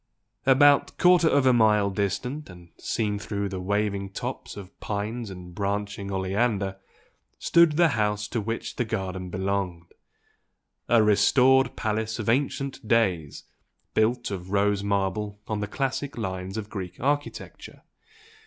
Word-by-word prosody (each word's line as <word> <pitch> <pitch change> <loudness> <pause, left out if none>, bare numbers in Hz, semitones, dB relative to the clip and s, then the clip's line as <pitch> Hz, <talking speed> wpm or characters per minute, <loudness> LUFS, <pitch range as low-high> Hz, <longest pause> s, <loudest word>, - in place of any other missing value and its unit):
About 140 +2 +5
quarter 180 -2 +5
of 140 -3 +3
a 130 - +6
mile 105 -3 +4
distant, 125 +9 -3
and 90 -1 -13
seen 105 -3 -1
through 100 -1 -3
the 95 -1 -5
waving 100 0 -1
tops 95 - -6
of 100 -2 -10
pines 110 +2 -4
and 90 -2 -10
branching 100 0 -3
oleander, 95 +1 0 0.6
stood 170 -2 +4
the 170 +2 +4
house 105 -4 0
to 115 - -1
which 115 +2 -4
the - - +1
garden 95 -4 -4
belonged, 95 -2 -3 1.0
a 115 -2 +5
"restored" 130 +5 +4
palace 110 0 -2
of 110 -2 -3
ancient 135 0 -1
days, 95 -10 +1 0.5
built 120 +1 +1
of 95 -2 -5
rose 100 0 +2
marble 100 +1 -1
on 110 -1 -2
the 105 - -2
classic 135 +4 -3
lines 95 -2 -4
of 105 -2 -4
Greek 95 -4 -6
architecture. 145 +3 -3
105 Hz, 135 wpm, -26 LUFS, 95-120 Hz, 1.0 s, a